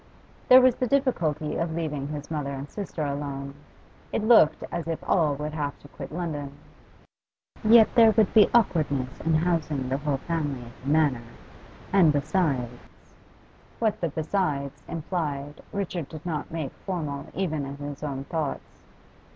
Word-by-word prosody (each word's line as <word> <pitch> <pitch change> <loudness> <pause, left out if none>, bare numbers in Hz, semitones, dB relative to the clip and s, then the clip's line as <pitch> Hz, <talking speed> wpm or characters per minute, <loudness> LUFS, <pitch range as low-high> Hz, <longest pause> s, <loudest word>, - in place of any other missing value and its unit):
There 255 +1 +10
was 255 -1 +5
the 255 - -2
difficulty 175 - 0
of 165 -1 -2
leaving 150 -4 -3
his 145 0 -6
mother 150 -3 -2
and 140 0 -5
sister 180 -3 -5
alone. 140 -1 -4 0.6
It 215 - -1
looked 220 -9 +5
as 170 -1 -3
if 165 -1 -1
all 155 -6 +2
would 150 +2 -5
have 145 -2 -3
to - - -15
quit - - -9
London. 155 -4 -4 1.1
Yet 220 0 +7
there 230 -3 +7
would 220 -2 +3
be 215 -2 +7
awkwardness 145 - +1
in 160 -1 +1
housing 155 -5 0
the 135 +1 0
whole 145 -2 -1
family 145 -4 -3
at 120 - -11
the 135 - -5
Manor; 145 -6 +2 0.7
and 180 -6 +6
besides 145 -5 -1 0.9
What 220 -2 0
the 170 - 0
'besides' 150 -4 -2
implied 150 -4 -4
Richard 180 -6 -3
did 155 +1 -10
not 155 -4 -3
make 160 -5 -4
formal 155 -7 -4
even 155 -6 -1
in 140 +1 -7
his 145 0 -7
own 140 -3 -4
thoughts. 155 -1 -4
155 Hz, 155 wpm, -26 LUFS, 140-175 Hz, 1.1 s, There